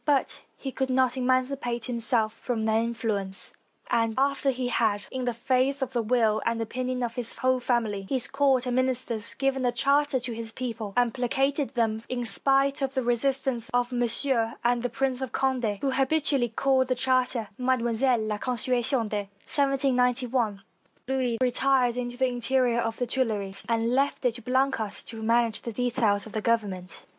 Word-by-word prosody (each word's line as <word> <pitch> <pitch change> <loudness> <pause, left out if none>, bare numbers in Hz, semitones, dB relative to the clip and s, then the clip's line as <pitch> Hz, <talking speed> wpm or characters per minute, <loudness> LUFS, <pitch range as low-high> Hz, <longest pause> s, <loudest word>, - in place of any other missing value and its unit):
But 285 -3 +1 0.2
he 270 - -5
could 265 0 -2
not 255 0 +2
emancipate 255 -2 0
himself 230 -2 +2
from 230 -2 -3
their 220 0 +2
influence; 225 -4 -2 0.4
and 230 -1 +1
after 275 +1 +1
he 250 -1 -1
had, 215 -4 +1
in 260 -1 -3
the 245 - +1
face 260 +3 0
of 265 - -5
the 240 - +1
will 225 -2 +2
and 230 0 -1
opinion 250 +2 -3
of 235 -1 -2
his 235 -1 -5
whole 255 0 +2
family, 220 -6 -1
his 260 -3 +2
court 275 -2 +2
and 250 0 -1
min 255 0 +3
isters, 235 -4 -2
given 270 -1 0
a 245 - +2
charter 280 +3 +2
to 240 -1 -4
his 225 0 -6
people, 225 -4 -5
and 245 -2 +3
placated 270 +2 -1
them 220 -2 0
in 245 -1 -2
spite 275 +7 +1
of 270 0 -2
the 260 - 0
resistance 245 0 0
of 245 0 +1
Monsieur 240 -1 +2
and 240 0 +2
the 245 - -1
Prince 265 +1 -1
of 265 - -4
Conde, 250 -6 0
who 275 - 0
habitually 270 -2 +1
called 260 +2 +1
the 255 - 0
charter 255 -3 +1
Mademoiselle 250 -1 +1
la 215 -1 -3
Constitution 245 0 +1
de 205 -2 -3 0.3
lygi, 250 -5 +1 0.5
Louis 255 -3 0
retired 255 -1 +2
into 245 0 -4
the 260 - +2
interior 245 0 +1
of 225 -1 -2
the 245 - -1
Tuileries, 215 -6 -1
and 230 0 +1
left 275 0 0
it 245 - +3
to 240 - -6
Blacas 255 -3 0
to 225 -1 -7
manage 230 0 +1
the 235 - -5
details 225 -3 +1
of 220 - -10
Government. 200 -6 -1
245 Hz, 175 wpm, -26 LUFS, 230-260 Hz, 0.5 s, min